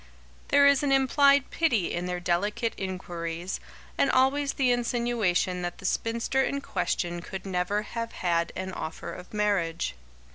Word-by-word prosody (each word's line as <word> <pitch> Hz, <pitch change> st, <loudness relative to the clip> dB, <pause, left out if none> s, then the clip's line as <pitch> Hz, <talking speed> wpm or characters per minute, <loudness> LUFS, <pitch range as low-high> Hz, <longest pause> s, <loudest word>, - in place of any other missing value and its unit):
There 285 Hz, 0 st, +5 dB
is 280 Hz, -2 st, +5 dB
an 285 Hz, -2 st, +1 dB
implied 275 Hz, +1 st, +4 dB
pity 240 Hz, -, +1 dB
in 175 Hz, +1 st, -2 dB
their 180 Hz, 0 st, -2 dB
delicate 205 Hz, +6 st, 0 dB
inquiries, 175 Hz, -2 st, -4 dB, 0.4 s
and 275 Hz, -, +4 dB
always 275 Hz, +2 st, +3 dB
the 260 Hz, -3 st, +2 dB
insinuation 235 Hz, -7 st, 0 dB
that 175 Hz, -1 st, -4 dB
the -, -, -10 dB
spinster 230 Hz, +3 st, 0 dB
in 280 Hz, +1 st, -1 dB
question 175 Hz, -5 st, -2 dB
could 190 Hz, +2 st, -7 dB
never 190 Hz, +2 st, 0 dB
have 230 Hz, +1 st, -5 dB
had 170 Hz, -2 st, 0 dB
an 190 Hz, 0 st, -4 dB
offer 160 Hz, -, -5 dB
of 180 Hz, -, -10 dB
marriage. 200 Hz, -, 0 dB
205 Hz, 150 wpm, -27 LUFS, 180-255 Hz, 0.4 s, There